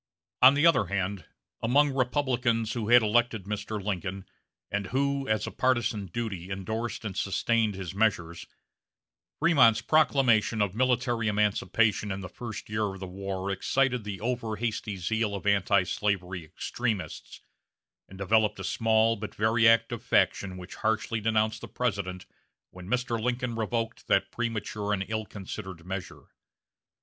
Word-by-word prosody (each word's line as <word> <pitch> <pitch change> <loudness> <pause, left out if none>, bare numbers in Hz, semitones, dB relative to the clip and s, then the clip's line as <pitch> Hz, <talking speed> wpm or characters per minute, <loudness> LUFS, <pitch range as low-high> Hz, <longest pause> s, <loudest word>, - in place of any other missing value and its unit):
On 130 +2 +8
the 145 +3 +3
other 140 - +4
hand, 100 0 -3 0.3
among 140 +5 +3
Republicans 125 -4 0
who 115 -3 -3
had 120 -1 +7
elected 115 -1 +1
Mr. 105 +2 -4
Lincoln, 95 -1 -3 0.5
and 100 -1 -2
who, 140 +2 0
as 110 -1 0
a - - -5
partizan 120 -6 0
duty, 95 -2 -4
indorsed 110 +5 -4
and 100 -4 -4
sustained 110 +2 +1
his 95 -3 -6
measures, 95 -5 0 0.9
Frémont's 130 -9 +5
proclamation 130 -8 +3
of 100 -3 +1
military 120 -1 +1
emancipation 105 0 +1
in 95 +1 -4
the 90 - -7
first 115 -3 -7
year 105 -1 -1
of - - -11
the 95 - -5
war 95 +1 -4
excited 125 +5 +1
the 100 -2 -5
over 115 -2 -2
hasty 110 -2 -3
zeal 105 +3 -1
of 100 - -7
antislavery 95 -2 +1
extremists, 105 +5 -4 0.7
and 95 - -12
developed 105 +1 +2
a - - -5
small 110 +2 +2
but 110 -1 -7
very 115 +2 +3
active 115 0 +3
faction 95 -2 +1
which 90 0 -9
harshly 110 0 0
denounced 110 0 +1
the - - -7
President 100 -6 -3 0.5
when 90 0 -11
Mr. 125 -2 0
Lincoln 125 +1 -1
revoked 115 +1 -3
that 100 - +2
premature 105 -3 -2
and 95 -1 -1
ill 110 -1 -3
considered 95 -3 -8
measure. 95 0 -6
110 Hz, 145 wpm, -28 LUFS, 100-120 Hz, 0.9 s, On